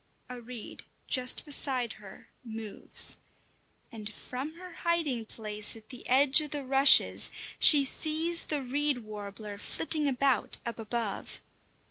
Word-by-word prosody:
A 250 -1 -9
reed 235 -2 -10 0.2
just 255 -1 +2
beside 260 -5 +2
her 190 -2 -15 0.2
moves, 220 -3 -1 0.7
and 220 -2 -8
from 265 +8 -8
her 360 0 -12
hiding 310 -11 -3
place 210 -1 -2
at 220 -1 -17
the 250 -3 -12
edge 270 +3 +4
of 300 - -7
the 290 -1 -5
rushes 270 +2 +4 0.3
she 290 -3 +8
sees 320 +4 +3
the 295 -3 -3
reed 280 -1 -2
warbler 205 -1 -10
flitting 310 +4 -1
about 270 -2 0
up 235 0 -6
above. 225 -1 -5
250 Hz, 130 wpm, -28 LUFS, 220-290 Hz, 0.7 s, she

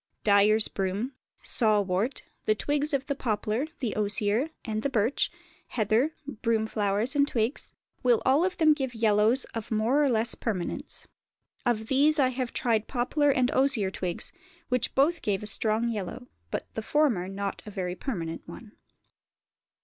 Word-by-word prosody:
Dyers' 210 +1 +5
broom, 200 +7 -2 0.3
saw 215 -4 +3
wort, 200 +6 -1 0.2
the 215 - +3
twigs 290 +5 -1
of 275 -2 0
the 280 - -1
poplar, 225 +1 -1
the 235 -5 -1
osier, 210 +6 +1 0.2
and 215 -2 -2
the 280 - 0
birch, 235 +1 +1 0.4
heather, 230 +7 +1 0.3
broom, 225 -1 +2
flowers 210 +4 0
and 285 0 +4
twigs, 235 0 -1 0.3
will 245 -3 +4
all 275 +5 +4
of 370 0 -1
them 310 -2 +6
give 265 -5 -3
yellows 220 +3 +3
of 225 -2 -5
more 230 +7 +2
or 285 - +3
less 230 -1 +2
permanence. 190 -7 -4 0.6
Of 220 -2 +1
these 285 +6 +3
I 265 -3 +4
have 255 -1 -3
tried 225 -3 0
poplar 280 +4 +1
and 255 -2 +2
osier 260 -8 +2
twigs, 180 -2 -2 0.4
which 250 -1 0
both 315 +5 +3
gave 200 -1 -1
a - - -4
strong 220 +2 +1
yellow, 225 +3 -4 0.2
but - - -3
the - - -3
former 265 -12 +1
not 195 +1 -4
a - - -4
very 185 -3 -3
permanent 175 - -4
one. 205 +6 -10
225 Hz, 160 wpm, -28 LUFS, 210-270 Hz, 0.6 s, them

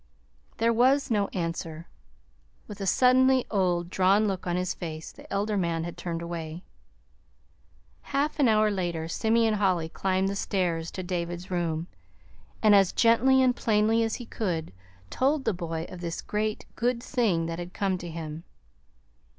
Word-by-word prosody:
There 230 +1 +2
was 260 +3 +3
no 205 -2 +2
answer. 165 -2 -4 0.8
With 205 -1 -9
a 195 - -2
suddenly 255 +3 +4
old, 180 -3 0
drawn 195 +3 +3
look 190 -2 -3
on 175 - 0
his 180 0 -1
face, 160 -2 -7
the - - -16
elder 205 +2 0
man 170 -3 0
had 170 0 -6
turned 170 -1 -4
away. 170 0 -6 1.4
Half 290 +3 -1
an 275 - +5
hour 215 -1 +4
later 175 -4 -2
Simeon 225 +5 +2
Holly 185 -6 +1
climbed 190 +2 0
the 200 - -2
stairs 175 -4 -1
to 185 - -6
David's 175 +1 -4
room, 165 -2 -1 0.8
and 215 -1 +6
as 195 -2 +5
gently 260 +3 +4
and 250 -1 +3
plainly 220 0 +2
as 225 -1 0
he 245 - -7
could 175 - -3 0.4
told 275 +2 +1
the 225 - +2
boy 165 -2 -4
of 180 - -10
this 170 -1 -4
great, 215 0 -2
good 240 0 0
thing 210 -10 +1
that 165 +1 -4
had 175 0 -6
come 190 -1 -1
to 175 - -7
him. 160 -1 -6
190 Hz, 160 wpm, -27 LUFS, 170-225 Hz, 1.4 s, and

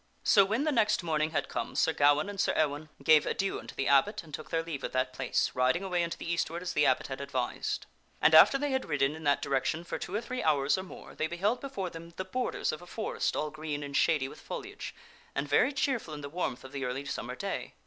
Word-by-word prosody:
So 200 - +6
when 220 +8 0
the 310 - +1
next 215 -7 +2
morning 155 -2 +1
had 160 - -1
come, - - -4
Sir 160 - +3
Gawaine 145 +3 +4
and 205 -1 -6
Sir - - +1
Ewaine 150 0 0
gave 155 -2 +6
adieu 195 0 -1
unto - - -10
the 135 - -1
abbot, 195 +10 +3
and 155 -2 -15
took 155 - -6
their 165 0 0
leave 155 -5 -5
of - - -4
that 130 0 0
place, 130 -1 0
riding 130 +8 +2
away 180 -2 0
unto 170 - -3
the - - -8
eastward, 170 +1 -2
as 180 - -3
the 150 - +4
abbot 130 - +2
had 135 0 -5
advised. 130 -3 -2 0.3
And - - +4
after 160 - +9
they 290 0 -1
had 265 -7 -1
ridden 145 0 +1
in 160 0 -9
that 140 0 +2
direction 135 +4 0
for 170 - -5
two 185 - -5
or 215 - 0
three 250 +2 -4
hours 145 -2 +3
or 190 - -3
more 185 - -11
they 160 - -1
beheld 200 +8 0
before 200 -10 -4
them 170 +1 -10
the 185 - -3
bor 250 +7 -1
ders - - -1
of 155 - -6
a 175 - -12
forest 220 +4 -2
all 150 0 -1
green 155 -1 -4
and 140 -1 -6
shady 150 -4 +3
with - - -12
foliage, - - -7 0.4
and 140 +1 -1
very 145 - +4
cheerful 260 - -1
in 145 - -7
the 140 - -6
warmth 165 -5 -3
of 130 - -10
the 140 -1 -4
early 130 +2 -3
summer 135 - -4
day. - - -4
160 Hz, 255 wpm, -30 LUFS, 140-190 Hz, 0.4 s, after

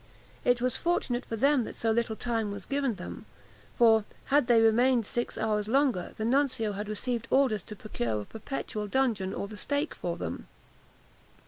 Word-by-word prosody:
It 245 -1 +3
was 250 -1 +1
fortunate 265 -8 0
for 225 - -3
them 275 +2 +3
that - - -7
so 225 - 0
little 225 -1 0
time 225 -2 -1
was 200 -1 -6
given 275 -4 0
them; 180 -1 -8 0.5
for, 225 -2 +6 0.3
had 290 -4 +5
they 235 -2 +6
remained 235 +1 +4
six 240 +3 -3
hours 210 -1 0
longer, 255 -6 +1
the 220 - -2
nuncio 255 -4 +1
had 205 +1 -5
received 230 +2 -2
orders 260 -7 +3
to 210 - -8
procure 120 - -3
a - - -8
perpetual 215 - -5
dungeon 220 -6 +1
or 200 - -4
the 210 0 -9
stake 285 +7 -1
for - - -4
them. - - -5
230 Hz, 180 wpm, -29 LUFS, 210-255 Hz, 0.5 s, for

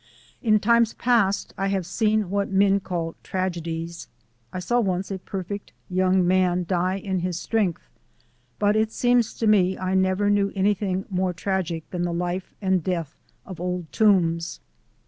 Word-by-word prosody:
In 215 -3 +4
times 235 +1 +3
past 230 -5 +1
I 195 - +1
have 195 -2 -1
seen 215 +1 0
what 200 0 0
men 195 0 +3
call 170 -4 -3
tragedies 170 -2 -4 0.4
I - - -5
saw 240 +7 +1
once 190 -3 -1
a 190 - -3
perfect 195 +2 -6 0.2
young 185 0 +3
man 180 -1 +2
die 185 +1 +1
in 190 -1 -2
his 175 -1 -2
strength 205 -7 -1 0.7
but 205 0 +2
it 220 0 +1
seems 245 -2 +2
to 230 - -2
me 190 -3 +4
I 185 0 -2
never 190 +2 +2
knew 200 -1 +2
anything 195 -1 0
more 185 -1 0
tragic 180 -3 -2
than 180 - -3
the 175 -1 -1
life 180 +2 -3
and 190 -3 +2
death 165 -4 -2 0.3
of 180 -4 -8
Old 180 -2 -3
Toombs. 170 -6 +2
190 Hz, 160 wpm, -24 LUFS, 180-205 Hz, 0.7 s, In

